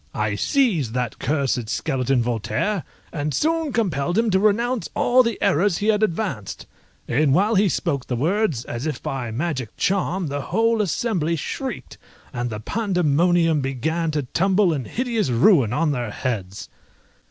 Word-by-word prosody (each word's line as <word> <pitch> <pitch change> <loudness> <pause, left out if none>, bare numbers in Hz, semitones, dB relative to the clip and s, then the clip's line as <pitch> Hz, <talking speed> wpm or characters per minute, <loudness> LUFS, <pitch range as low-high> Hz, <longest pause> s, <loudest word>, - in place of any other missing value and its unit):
I 105 -1 0
seized 165 - +1
that 125 -2 -2
cursed 135 -6 -1
skeleton 130 -4 0
Voltaire, 120 - -1 0.3
and 150 -2 -2
soon 320 -1 0
compelled 175 - 0
him 225 -1 +2
to 190 - +3
renounce 225 +4 +1
all 250 +1 +4
the 230 -2 -1
errors 175 +3 +2
he 210 - 0
had 210 -1 +2
advanced; 170 - -2 0.4
and 140 +2 +2
while 205 +6 +3
he 200 -1 +3
spoke 140 -8 -2
the 125 - -1
words, 160 - 0
as 120 +5 -4
if 155 - -4
by 130 -3 -3
magic 130 -1 -3
charm, 190 -1 0
the 145 -1 -3
whole 225 - +1
assembly 180 -4 0
shrieked, 260 - -5 0.3
and 120 -1 -2
the 105 -2 -5
pandemonium 175 - +1
began 160 +6 -1
to 150 -2 -1
tumble 190 +6 +2
in 135 -5 -3
hideous 230 - -1
ruin 125 - +4
on 150 +4 +1
their 120 -5 -2
heads. 100 -4 -4
160 Hz, 155 wpm, -22 LUFS, 130-210 Hz, 0.4 s, all